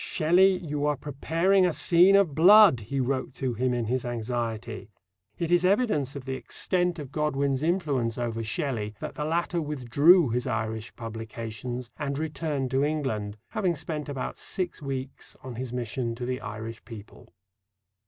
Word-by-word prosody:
"Shelley, 185 +4 +3
you 150 -4 -2
are 150 -1 +1
preparing 165 +7 +1
a 180 - +3
scene 175 +4 +5
of 195 -7 +3
blood!" 190 - +7
he 135 +6 -4
wrote 130 0 -2
to 130 -2 -2
him 125 +3 0
in 120 -2 -1
his 125 +3 -1
anxiety. 115 -2 -4 0.5
It 170 0 -2
is 175 0 +4
evidence 185 - +1
of 140 -2 -7
the 135 - -3
extent 175 +6 -1
of 145 -4 -7
Godwin's 140 -3 0
influence 150 - 0
over 115 -2 -2
Shelley 110 -2 -3
that - - -5
the 150 - -4
latter 170 +2 0
withdrew 150 +3 +4
his 125 +3 -1
Irish 110 -1 -3
publications 115 +2 -6
and 140 -1 -2
returned 150 -4 -2
to 135 +1 +2
England, 130 -9 -2
having 190 -6 0
spent 150 -1 -4
about 135 -2 -4
six 180 -4 -4
weeks 135 -1 -6
on 130 -1 -7
his 125 +1 -5
mission 120 -1 -3
to 120 +1 -5
the 125 0 -3
Irish 110 +2 -7
people. 110 -3 -12
135 Hz, 165 wpm, -27 LUFS, 120-160 Hz, 0.5 s, blood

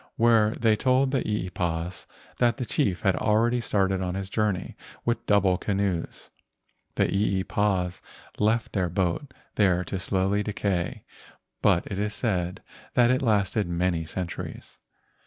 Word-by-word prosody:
When 115 -2 +4
they 110 -2 +2
told 130 +4 +2
the 135 -3 +1
eepas 90 -4 -3 0.3
that 120 -2 +3
the 125 - -3
chief 100 - 0
had 95 -3 +2
already 115 +3 +2
started 95 -3 +1
on 90 -1 -2
his 95 0 -5
journey 105 -4 -1 0.3
with 120 -1 0
double 95 -3 +3
canoes, 100 -4 -2 0.6
the - - +3
eepas 95 -2 0 0.4
left 110 +2 +1
their 95 -4 0
boat 95 - -1 0.2
there 90 -3 +3
to 95 +2 -4
slowly 95 +2 0
decay, 100 -4 -2 0.6
but - - +3
it 100 - -4
is 105 +1 -1
said 90 -6 -1 0.3
that 120 0 +5
it 130 - +1
lasted 105 -3 +1
many 85 -1 0
cent¬ 85 +2 -4
uries. - - -8
100 Hz, 140 wpm, -26 LUFS, 90-110 Hz, 0.6 s, that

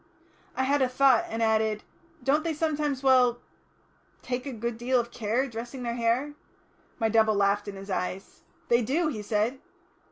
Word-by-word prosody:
I 260 - 0
had 280 +2 +2
a 260 - +3
thought, 255 -2 +4
and 225 +1 -2
added, 220 -1 +1 0.4
"Don't 285 +4 +2
they 330 -2 -2
sometimes, 295 -3 -1
well 250 -2 +5 0.9
take 250 +2 -3
a - - -3
good 235 0 -3
deal 250 +1 +2
of 235 0 -4
care, 240 +3 -1
dressing 240 +2 -7
their 235 -1 -2
hair?" 240 +5 0 0.6
My 225 - +1
double 220 -1 +3
laughed 200 +1 +1
in 200 - -6
my 195 - -2
eyes. 185 +1 -4 0.3
"They 235 0 +4
do," 305 +8 0
he 220 -8 -4
said. 215 +5 -1
240 Hz, 170 wpm, -27 LUFS, 220-270 Hz, 0.9 s, well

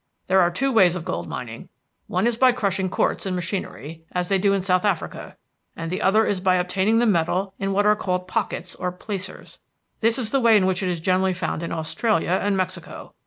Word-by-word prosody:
"There 190 0 +4
are 175 - +4
two 270 +11 -1
ways 185 -7 +5
of 170 -3 -5
gold - - -3
mining. - - -7 0.4
One - - 0
is 240 -1 +2
by 255 +1 +4
crushing 190 -4 -1
quartz 195 - 0
in 185 - -1
machinery, 165 - -5
as 180 -1 -1
they 195 -1 +2
do 200 +1 +3
in 195 -2 0
South 185 -1 +2
Africa, 200 -5 -3 0.4
and 165 0 -5
the 185 - -2
other 215 +3 +4
is 200 - 0
by 185 -1 +3
obtaining 190 +4 +1
the 240 - +3
metal 190 0 +1
in 195 0 -1
what 205 +1 +2
are 210 0 +5
called 180 -2 -2
pockets 185 0 -3
or 180 - -3
placers. 190 +1 -7 0.4
This 230 +2 +2
is 230 -4 -4
the 275 - +2
way 230 -3 +5
in 190 - +2
which 190 0 0
it 185 - -1
is 175 -2 -3
generally 185 +2 +2
found 175 -2 -3
in 170 - -4
Australia 180 +3 0
and 200 -1 +1
Mexico. 185 -2 -5
190 Hz, 220 wpm, -23 LUFS, 180-205 Hz, 0.4 s, ways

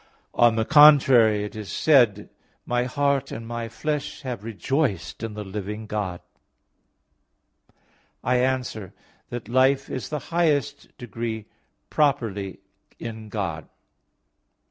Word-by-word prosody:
On 120 -1 +4
the 110 0 0
contrary, 130 -8 +6
It 105 - -7
is 105 -5 -7
said 125 - +4
(Ps. 105 - -10
83:3): - - -16 0.4
"My 120 0 0
heart 140 0 0
and 115 - -6
my 120 -1 -4
flesh 150 +5 -4
have 125 -6 -5
rejoiced 110 - -2
in 115 -2 -5
the 105 - -5
living 105 +2 -6
God." 100 -4 -4 2.0
I 125 +1 +2
answer 125 -6 -2 0.3
that, 120 -3 -6
Life 130 +3 +2
is 130 - -4
in - - -2
the 145 - -5
highest 155 -6 0
degree 115 -1 -5 0.5
properly 115 -10 0 0.4
in 110 -2 -8
God. 85 -8 -4
115 Hz, 125 wpm, -24 LUFS, 105-135 Hz, 2.0 s, contrary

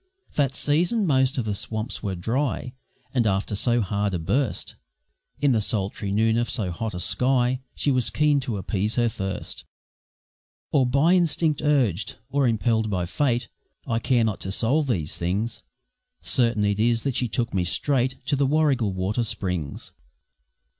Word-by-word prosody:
That 135 -3 +1
season 175 - +2
most 130 -4 +2
of 120 - -1
the 105 - -1
swamps 110 +2 -3
were 95 -2 -3
dry, 125 +6 -2 0.4
And 120 -4 +2
after 95 +1 0
so 120 +3 +2
hard 100 0 -1
a - - +1
burst, 120 - -1 0.6
In 145 -2 +3
the 110 -3 +2
sultry 100 -1 -1
noon 110 +2 +2
of 120 0 0
so 100 -7 0
hot 110 +3 -4
a - - -4
sky, 125 +4 +1 0.2
She 145 - +1
was 130 -3 +2
keen 150 -2 +2
to 125 -5 -3
appease 100 +3 -1
her 120 -1 +2
thirst 95 -4 -5 1.1
Or 135 -4 +3
by 140 +7 +3
instinct 165 -4 +2
urged 130 - +1 0.2
or 140 -2 +2
impelled 110 -1 +1
by 90 -3 -1
fate 120 - 0 0.4
I 115 -3 0
care 120 -1 +2
not 110 -3 -1
to 95 - -3
solve 135 +9 +2
these 85 - -1
things 100 +7 -2 0.6
Certain 115 -4 +2
it 100 0 0
is 115 +1 +2
that 135 - 0
she 125 - 0
took 120 +1 -2
me 95 -2 +1
straight 130 +7 0
To 145 - +1
the 140 0 +2
Warrigal 135 -8 +2
water 95 +5 -1
springs. 90 -9 -4
115 Hz, 165 wpm, -24 LUFS, 100-135 Hz, 1.1 s, In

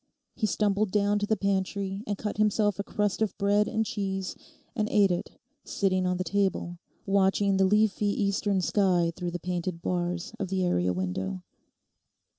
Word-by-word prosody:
He 220 - -1
stumbled 205 +1 +1
down 205 +1 +2
to 205 - -1
the 220 - +1
pantry 195 0 -1
and 205 -1 -2
cut 210 0 -4
himself 210 -1 +2
a - - 0
crust 205 0 -1
of 215 -4 0
bread 205 +1 +2
and 220 0 0
cheese, 195 -2 -3 0.4
and 215 -3 0
ate 200 -3 +4
it, 175 - -4 0.3
sitting 185 -2 0
on 180 0 0
the 185 - -1
table, 190 -3 -1 0.3
watching 195 0 +2
the 190 - +4
leafy 210 +1 +2
eastern 200 -1 +1
sky 180 -4 +2
through 175 - -3
the 175 - -4
painted 175 0 -3
bars 175 +2 -2
of 195 - -2
the 185 0 0
area 90 - +1
window. 95 0 -3
195 Hz, 170 wpm, -28 LUFS, 180-205 Hz, 0.4 s, ate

